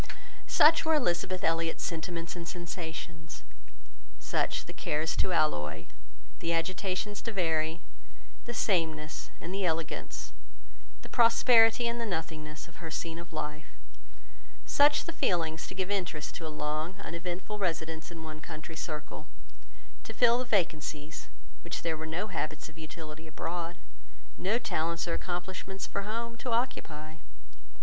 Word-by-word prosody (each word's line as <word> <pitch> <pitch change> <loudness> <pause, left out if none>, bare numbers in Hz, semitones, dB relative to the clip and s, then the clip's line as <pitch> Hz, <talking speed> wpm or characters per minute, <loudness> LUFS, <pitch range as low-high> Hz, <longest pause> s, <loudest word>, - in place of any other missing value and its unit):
Such 320 +2 +7
were 320 0 +4
Elizabeth 185 - +1
Elliot's 165 0 +2
sentiments 165 +1 -2
and 170 -1 -5
sensations; 165 -2 -5 0.7
such - - 0
the - - -8
cares 155 +2 0
to - - +2
alloy, 80 - +2 0.5
the 170 - +1
agitations 185 +4 0
to 230 - -3
vary, 165 -3 +1 0.6
the 240 - -3
sameness 160 -7 +1
and 180 - -5
the 195 0 0
elegance, 165 -2 -1 0.7
the - - -8
prosperity 230 0 +6
and 235 0 0
the 230 - -1
nothingness 160 -4 -3
of 165 - -16
her 170 -3 -5
scene 165 +1 -3
of 170 0 -9
life; 150 -1 -4 1.0
such 290 +1 +5
the 335 - -4
feelings 165 - +1
to - - -7
give 190 +1 -1
interest 170 -6 -1
to 165 - -4
a - - -3
long, 155 +4 -1
uneventful 180 +5 -4
residence 165 -3 -1
in 165 -2 -8
one 155 -1 -7
country 160 0 -7
circle, 155 -2 -5 0.8
to - - -7
fill 240 0 +6
the 255 - -1
vacancies 160 -7 0 0.4
which 170 - -4
there 165 -1 +1
were 160 0 -5
no 175 +6 0
habits 155 -6 -3
of 160 - -15
utility 160 0 -7
abroad, 170 +2 -3 0.6
no 205 +5 +2
talents 170 -8 0
or 170 - +1
accomplishments 185 +2 -3
for 200 - -2
home, 230 +1 -2
to 250 - -4
occupy. 160 -11 -1
170 Hz, 140 wpm, -31 LUFS, 160-195 Hz, 1.0 s, Such